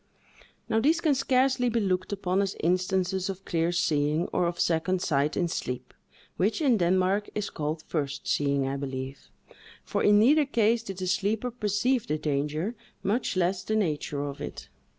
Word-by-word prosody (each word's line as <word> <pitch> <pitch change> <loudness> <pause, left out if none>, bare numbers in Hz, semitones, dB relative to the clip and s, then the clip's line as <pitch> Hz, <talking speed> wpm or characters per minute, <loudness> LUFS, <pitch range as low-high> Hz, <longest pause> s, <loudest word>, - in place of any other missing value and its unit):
Now 220 - +2
these 315 +8 +3
can 315 -4 +2
scarcely 255 -1 +2
be 235 0 +1
looked 185 -2 -1
upon 190 -1 0
as 195 -1 -1
instances 185 +2 0
of 195 0 -6
clear 165 0 0
seeing, 155 -2 +1
or 180 -1 +2
of 170 0 -4
second 175 +3 +1
sight 145 -3 0
in 175 - +1
sleep, 125 -6 -4 0.4
which, 210 +4 +1
in 270 -7 +3
Denmark, 185 +3 +2
is 210 -1 -2
called 155 +1 -3
first 145 -3 -3
seeing, 140 -2 +1
I 135 +1 -2
believe; 135 0 -6 0.5
for - - -2
in 205 0 +5
neither 290 +8 +5
case 230 -3 +2
did 195 -5 -7
the 185 - -3
sleeper 205 +6 0
perceive 235 +2 0
the 150 - 0
danger, 150 +7 -1 0.3
much 210 0 0
less 180 +1 +1
the 220 - -1
nature 150 -7 -1
of 140 -1 -6
it. - - -7
185 Hz, 170 wpm, -27 LUFS, 155-215 Hz, 0.5 s, in